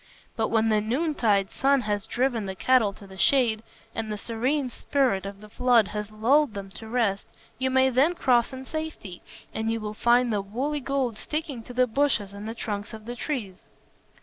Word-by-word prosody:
But 225 - +1
when 225 0 +2
the 215 -1 +3
noontide 225 - +1
sun 275 0 +2
has 210 -1 -1
driven 240 -4 0
the 190 - -4
cattle 245 0 +3
to 200 - -13
the 190 -1 -12
shade, 240 -6 +3 0.3
and 220 -1 -3
the 210 - -3
serene 255 +6 -1
spirit 240 -9 0
of 200 0 -9
the 210 - -11
flood 235 -1 +3
has 210 0 -4
lulled 235 +4 +2
them 195 -1 -6
to 220 +2 -10
rest, 220 -4 0 0.3
you 260 0 +1
may 260 0 +4
then 280 +8 +3
cross 245 -6 +3
in 260 0 -8
safety, 310 - -6 0.3
and 220 0 -1
you 225 - -1
will 210 -1 -5
find 240 +1 +3
the 205 - +1
woolly 260 +10 -2
gold 265 -5 -1
sticking 300 -5 -3
to 245 - -9
the 255 0 +4
bushes 230 -5 0
and 205 +1 -7
the 225 - -5
trunks 210 -1 -4
of 215 -1 -12
the 240 +1 -5
trees." 235 -9 -5
230 Hz, 200 wpm, -26 LUFS, 210-260 Hz, 0.3 s, may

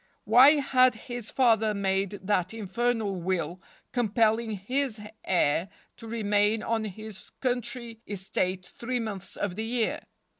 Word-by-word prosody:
Why 265 +4 +8
had 255 -4 +4
his 240 0 -6
father 225 -4 +3
made 195 0 -1
that 185 0 0
infernal 220 -2 -1
will 175 -1 -2 0.3
compelling 225 -1 +2
his 250 +3 -2 0.2
heir 175 0 +2 0.3
to 230 - -10
remain 210 -1 +1
on 225 -1 0
his 215 0 -8
country 245 -2 -3
estate 185 -2 -2
three 245 +5 -4
months 210 -5 -5
of 195 -3 -2
the 220 - -3
year? 230 -1 0
220 Hz, 125 wpm, -28 LUFS, 195-240 Hz, 0.3 s, Why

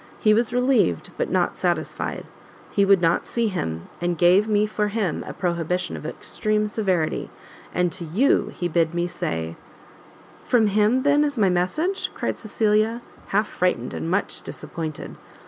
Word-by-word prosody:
He 215 - +4
was 230 +2 +2
relieved, 250 - +2
but - - -1
not - - +1
satisfied; - - -2 0.5
he 200 - +3
would 195 -2 +5
not 165 +1 +2
see 235 -2 0
him, 80 - -4
and 175 -1 0
gave 180 +6 +5
me 210 -1 +3
for 210 0 -1
him 205 -6 -1
a - - -4
prohibition 175 0 -1
of - - -6
extreme 215 -1 -1
severity, 190 -7 -1 0.4
and 180 -1 +1
to 185 0 -6
you 205 - +2
he 175 - -3
bid 165 0 +1
me 175 0 +1
say 80 - -3 0.4
" - - -24
"From 235 -3 +4
him, 215 +5 +3
then, 290 +1 +4
is 285 -3 -1
my 200 -4 +4
message?" 305 - 0
cried - - -2
Cecilia, 215 +1 +1 0.2
half 210 +2 +1
frightened, 180 -10 -1
and 165 - -3
much 195 +3 -1
disappointed. 160 -3 -6
195 Hz, 165 wpm, -23 LUFS, 170-220 Hz, 0.5 s, would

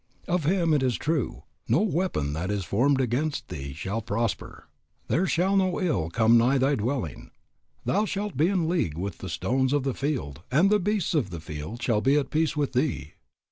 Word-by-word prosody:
Of 175 -3 0
him 170 -1 +2
it 145 - +3
is 130 -3 +1
true, 155 -4 -2 0.2
"No 165 - +3
weapon 175 - 0
that 85 +5 -3
is 100 -3 -1
formed 135 +9 +2
against 135 +5 -1
thee 70 -6 -5
shall 100 +8 -3
prosper;" 115 +2 -3 0.4
"There 190 +3 +2
shall 185 +4 +2
no 185 -2 +2
ill 105 - 0
come 115 +5 +4
nigh 125 +4 +3
thy 135 +2 +2
dwelling;" 120 - -3 0.6
"Thou 210 +2 +2
shalt 205 -1 -3
be 150 +6 +3
in 185 -4 +1
league 160 - 0
with 95 +1 -4
the - - -6
stones 130 +2 0
of 145 -2 +1
the 135 -1 -1
field, 125 - -3
and 165 +10 +4
the 210 - +4
beasts 205 -2 0
of 145 - +1
the 85 -2 -6
field 80 +9 -7
shall 110 -4 +2
be 135 +5 +3
at 145 - -1
peace 155 0 +1
with 145 -3 0
thee." 125 - -1
135 Hz, 200 wpm, -26 LUFS, 105-165 Hz, 0.6 s, come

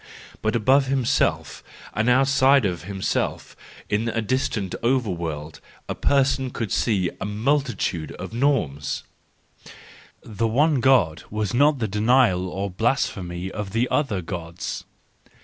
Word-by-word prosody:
But 110 +2 0
above 135 +5 +3
himself, 130 -3 0 0.3
and 110 +3 +1
outside 135 0 +4
of 90 -3 -2
himself, 95 -1 -2 0.3
in 110 +3 0
a 115 - -1
distant 115 -5 -1
over¬ 120 -5 +1
world, 75 -3 -5 0.3
a - - -2
person 135 -1 +1
could 115 -4 -4
see 95 -6 +1
a - - -2
multitude 110 - -1
of - - -8
norms: 80 - 0 1.2
the 115 +1 -2
one 145 +5 +2
God 125 - +3
was 105 +1 -2
not 145 +4 +4
the 115 -3 -1
denial 105 -3 +2
or 95 +2 -4
blasphemy 95 -5 -1
of 105 -2 -5
the 115 +3 +1
other 110 -11 0
Gods 85 -1 -6
110 Hz, 130 wpm, -23 LUFS, 95-130 Hz, 1.2 s, outside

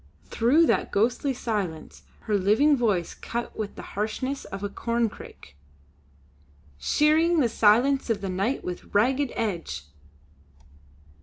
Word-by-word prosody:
Through 280 +9 +4
that - - +1
ghostly 240 +7 +1
silence 205 -10 -4 0.2
her 215 - -1
living 215 +10 +4
voice 210 -9 0
cut 235 +1 -5
with 210 -2 -5
the - - -8
harshness 255 +7 -3
of 195 +1 -7
a - - 0
corncrake. 230 - -4 1.2
"Shearing 310 - +3
the 255 - +3
silence 235 +5 +3
of 225 -3 +1
the 195 - -3
night 195 +8 -1
with 180 +2 -7
ragged 260 +6 +2
edge." 185 - -3
230 Hz, 125 wpm, -26 LUFS, 200-270 Hz, 1.2 s, Through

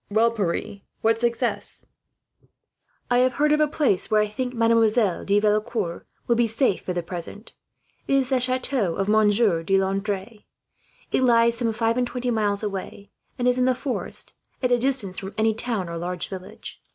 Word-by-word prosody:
"Well, 225 +3 +3
Pierre, 200 -1 -3 0.2
what 225 0 +2
success?" 235 0 -1 1.3
"I 245 - +4
have 255 +1 +2
heard 300 +1 +2
of 300 - +3
a 305 - +4
place 285 - 0
where 215 -1 +3
I 210 - +3
think 250 +4 -4
Mademoiselle 230 -4 +2
de 200 +1 +2
Valecourt 210 -3 -1 0.2
would 235 - +1
be 235 - +4
safe, 225 -2 +1
for - - -4
the 175 -1 -2
present. 175 +5 -8 0.5
It 275 - +2
is 265 -2 +1
the 260 -2 +2
chateau 255 -7 0
of 195 - -1
Monsieur 210 -4 +3
de 195 +4 +2
Landres. 195 +2 -2 0.7
It - - +1
lies 235 -1 +4
some 235 -2 0
five 230 +2 0
and 245 - +1
twenty 250 0 -3
miles 210 -2 0
away, 200 0 -6 0.3
and 245 -1 0
is 250 0 +2
in 250 - +3
the 255 0 +2
forest, 260 +1 -3 0.3
at 250 - +1
a 245 - +4
distance 245 -8 0
from 195 +1 -8
any 220 0 +2
town 220 -4 -3
or 170 0 -5
large 180 +1 -4
village. 185 -1 -9
225 Hz, 185 wpm, -24 LUFS, 200-245 Hz, 1.3 s, I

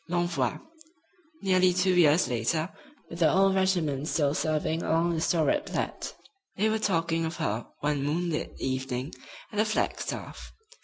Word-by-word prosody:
L'ENVOI 175 -7 0 0.8
Nearly 185 -1 +4
two 185 0 +3
years 165 -1 +5
later, 140 +8 0 0.4
with 165 - -9
the 160 -3 +5
old 195 0 +4
regiment 170 -7 +1
still 145 -3 +1
serving 155 +1 0
along 165 +2 +1
the 160 - -1
storied 165 -2 +1
Platte, - - -3 0.4
they 215 +3 +2
were 220 0 0
talking 165 -5 0
of 160 +1 -3
her 110 +3 -2
one 145 -1 0
moonlit 155 +3 -2
evening 130 +1 -3 0.4
at 210 - -7
the 215 - +4
flagstaff. 215 - -3
165 Hz, 145 wpm, -28 LUFS, 145-180 Hz, 0.8 s, years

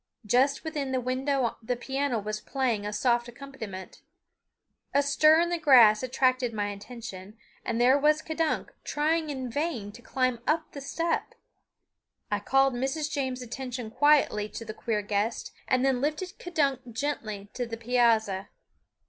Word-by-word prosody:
Just 255 +6 +2
within 295 -4 -3
the 260 - +1
window 255 0 -1
the 240 +2 -2
piano 270 +1 -1
was 215 0 -4
playing 240 -7 -1
a - - -3
soft 240 +2 +1
accompaniment. 235 -7 -9 0.9
A 285 - +5
stir 310 +3 +5
in 345 - +1
the 345 -1 -1
grass 240 -9 +7
attracted 255 -2 +1
my 205 -1 -1
attention, 205 -1 -9 0.3
and 230 0 -2
there 255 +4 +5
was 305 +2 +3
K'dunk 320 0 -1
trying 310 +1 0
in 260 -3 -4
vain 245 -5 -3
to 235 +3 -13
climb 255 -1 0
up 315 0 0
the 280 - -8
step. 330 +5 -2 1.0
I 205 - +1
called 270 +4 +3
Mrs. 270 +5 -2
James' 260 -4 -2
attention 245 -2 -6
quietly 290 -7 +3
to 230 - -7
the 215 - -6
queer 215 -1 -2
guest, 205 +3 -1 0.2
and 255 0 +2
then 260 -2 +2
lifted 305 +6 -3
K'dunk 275 -8 -1
gently 215 -6 -4
to 245 -2 -3
the 230 0 -5
piazza. 225 -5 +2
255 Hz, 155 wpm, -28 LUFS, 225-285 Hz, 1.0 s, grass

